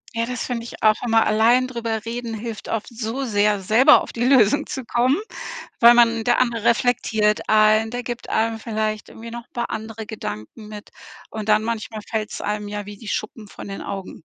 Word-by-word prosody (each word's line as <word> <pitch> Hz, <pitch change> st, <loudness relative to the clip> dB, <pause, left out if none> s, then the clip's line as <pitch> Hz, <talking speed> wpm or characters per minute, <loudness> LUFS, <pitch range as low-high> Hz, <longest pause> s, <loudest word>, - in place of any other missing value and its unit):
Ja, 230 Hz, 0 st, -1 dB
das 250 Hz, 0 st, -3 dB
finde 240 Hz, -2 st, -3 dB
ich 235 Hz, -, -10 dB
auch 215 Hz, -1 st, +6 dB
immer, 225 Hz, -2 st, +3 dB
allein 230 Hz, +4 st, +4 dB
drüber 230 Hz, -3 st, -4 dB
reden 230 Hz, -1 st, -4 dB
hilft 220 Hz, 0 st, -7 dB
oft 225 Hz, -2 st, -2 dB
so 235 Hz, +3 st, -4 dB
sehr, 210 Hz, -3 st, +2 dB
selber 220 Hz, +7 st, +6 dB
auf -, -, -9 dB
die 235 Hz, -, -2 dB
Lösung 260 Hz, +2 st, +4 dB
zu 265 Hz, -4 st, -5 dB
kommen, 250 Hz, +4 st, +2 dB, 0.6 s
weil 235 Hz, 0 st, +8 dB
man 230 Hz, -1 st, +4 dB
der 240 Hz, +1 st, +2 dB
andere 235 Hz, -3 st, 0 dB
reflektiert 230 Hz, -3 st, +1 dB
einen, 215 Hz, +1 st, +4 dB
der 245 Hz, +1 st, -4 dB
gibt 240 Hz, 0 st, -6 dB
einem 225 Hz, 0 st, 0 dB
vielleicht 215 Hz, -1 st, -3 dB
irgendwie 230 Hz, +1 st, -10 dB
noch 235 Hz, 0 st, -8 dB
'n -, -, -52 dB
paar 240 Hz, -1 st, -3 dB
andere 220 Hz, 0 st, -6 dB
Gedanken 210 Hz, -, -7 dB
mit 210 Hz, -1 st, -10 dB, 0.4 s
und 215 Hz, -1 st, -5 dB
dann, 215 Hz, 0 st, +4 dB
manchmal 220 Hz, -1 st, -4 dB
fällt's 215 Hz, -2 st, -3 dB
einem 210 Hz, 0 st, -3 dB
ja 205 Hz, 0 st, -5 dB
wie 205 Hz, -1 st, -9 dB
die 220 Hz, -, -12 dB
Schuppen 215 Hz, +2 st, -4 dB
von -, -, -10 dB
den 195 Hz, 0 st, -6 dB
Augen. 195 Hz, -4 st, -7 dB
225 Hz, 200 wpm, -22 LUFS, 215-235 Hz, 0.6 s, weil